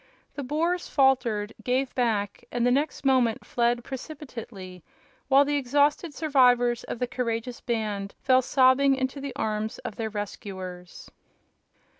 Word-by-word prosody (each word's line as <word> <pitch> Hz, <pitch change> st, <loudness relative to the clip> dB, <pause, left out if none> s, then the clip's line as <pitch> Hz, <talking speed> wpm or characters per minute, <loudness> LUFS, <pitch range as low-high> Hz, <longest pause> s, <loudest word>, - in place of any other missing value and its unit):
The 285 Hz, -, -5 dB
Boers 330 Hz, +6 st, -1 dB
faltered, 240 Hz, -7 st, +2 dB
gave 255 Hz, +2 st, 0 dB
back, 215 Hz, -5 st, -1 dB
and 240 Hz, 0 st, 0 dB
the 245 Hz, -, +4 dB
next 280 Hz, +1 st, -1 dB
moment 255 Hz, -4 st, +2 dB
fled 240 Hz, 0 st, 0 dB
precipitately, 235 Hz, -, -8 dB, 0.4 s
while 275 Hz, +1 st, +5 dB
the 290 Hz, 0 st, 0 dB
exhausted 285 Hz, +4 st, +1 dB
survivors 245 Hz, -5 st, +3 dB
of -, -, -5 dB
the 250 Hz, -, 0 dB
courageous 240 Hz, -1 st, -3 dB
band 210 Hz, -4 st, -3 dB
fell 260 Hz, -1 st, +4 dB
sobbing 265 Hz, +1 st, +4 dB
into 265 Hz, +1 st, -3 dB
the 280 Hz, -1 st, -6 dB
arms 215 Hz, 0 st, -2 dB
of 210 Hz, -, -5 dB
their 225 Hz, -1 st, -2 dB
rescuers. 190 Hz, -4 st, -7 dB
245 Hz, 135 wpm, -26 LUFS, 220-275 Hz, 0.4 s, while